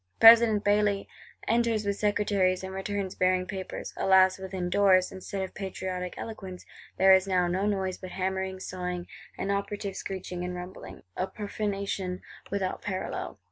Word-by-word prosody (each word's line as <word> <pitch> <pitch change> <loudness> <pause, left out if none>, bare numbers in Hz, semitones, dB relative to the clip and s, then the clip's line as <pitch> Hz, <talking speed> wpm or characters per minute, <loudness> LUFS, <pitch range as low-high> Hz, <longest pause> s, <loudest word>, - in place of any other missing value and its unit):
—President 225 -2 +8
Bailly 205 -1 +2 0.4
enters 230 -2 +2
with 200 0 0
Secretaries; 200 -3 +1
and 190 0 -5
returns 195 0 -3
bearing 185 0 +2
papers: 190 0 -6
alas, 190 0 +4
within 190 -1 -4
doors, 185 0 +4
instead 190 +1 -5
of 190 - -6
patriotic 185 -2 -4
eloquence, 190 -5 -7 0.3
there 190 0 +7
is 190 +1 +4
now 180 -2 +2
no 185 +3 0
noise 190 -3 -1
but 185 - -7
hammering, 190 0 -2
sawing, 180 -1 -4 0.3
and 200 - -1
operative 200 0 -3
screeching 180 -2 -5
and 180 0 -4
rumbling! 180 - -9
A 185 - -1
profanation 200 -2 -3 0.3
without 195 -2 -2
parallel. 190 - -4
190 Hz, 145 wpm, -28 LUFS, 185-200 Hz, 0.4 s, President